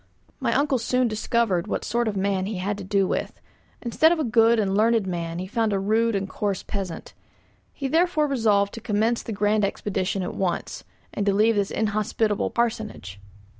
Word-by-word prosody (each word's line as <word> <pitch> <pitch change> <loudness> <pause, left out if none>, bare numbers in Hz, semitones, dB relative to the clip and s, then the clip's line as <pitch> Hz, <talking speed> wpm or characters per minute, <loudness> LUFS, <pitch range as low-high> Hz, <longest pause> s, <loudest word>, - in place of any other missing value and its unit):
My 235 -3 0
uncle 275 -2 +2
soon 250 +2 +1
discovered 215 -4 0
what - - -3
sort 235 +1 0
of 210 - -1
a - - -1
man 195 -1 0
he 210 -2 -4
had 200 +3 -2
to - - -6
do 195 0 +1
with; - - -3 0.4
instead 265 +7 +3
of 345 - +2
a 315 - 0
good 230 -1 +4
and 195 -3 +1
learned 225 0 +3
man 170 -2 -3
he 180 - -4
found 220 +1 0
a - - +1
rude 220 +3 +1
and 195 0 -1
coarse 200 0 -2
peasant. 190 -5 -5 0.6
He 275 - -4
therefore 325 +1 +2
resolved 215 -7 +2
to 230 - -7
commence 225 +1 0
the - - -7
grand 210 +1 +1
expedition 195 -1 -1
at 180 - -4
once, 185 -3 -3 0.3
and 205 - -2
to 200 - +4
leave 220 +3 +4
this 200 -1 0
inhospitable 215 0 0
parsonage. 220 - -3
215 Hz, 195 wpm, -24 LUFS, 195-235 Hz, 0.6 s, good